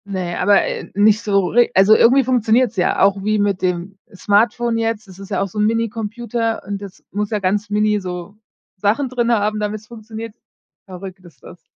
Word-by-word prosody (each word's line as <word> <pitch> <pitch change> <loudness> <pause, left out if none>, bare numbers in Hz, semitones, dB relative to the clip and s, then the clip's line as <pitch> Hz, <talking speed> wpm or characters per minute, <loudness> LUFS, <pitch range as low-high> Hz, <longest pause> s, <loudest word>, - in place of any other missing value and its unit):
Ne, 185 -3 -4
aber, 200 +2 +4
äh, - - -5
nicht 210 +2 +4
so 200 -4 +1
re 240 +1 +3
also, 195 +3 +6
irgendwie 260 +5 +5
funktioniert's 240 -1 +2
ja 180 - +1
auch 195 0 +2
wie 215 +1 +1
mit 205 -2 0
dem 185 +1 -3 0.2
Smartphone 230 +4 +1
jetzt. 225 -2 -2
Das 190 0 -14
ist 195 0 -10
ja 195 - -1
auch 195 - 0
so 205 +3 -7
'n 210 - +3
Minicomputer 230 +1 -2
und 200 0 -5
das 195 -2 -11
muss 205 +1 -2
ja 215 - -1
ganz 205 +2 -1
mini 210 0 +1
so 180 +1 -7 0.4
Sachen 215 +8 0
drin 240 -1 0
haben, 215 -1 +1
damit's 210 0 -4
funktioniert. 225 -1 -9 0.5
Verrückt 190 0 -9
ist 175 -3 -18
das. 175 - -14
210 Hz, 195 wpm, -19 LUFS, 195-225 Hz, 0.5 s, also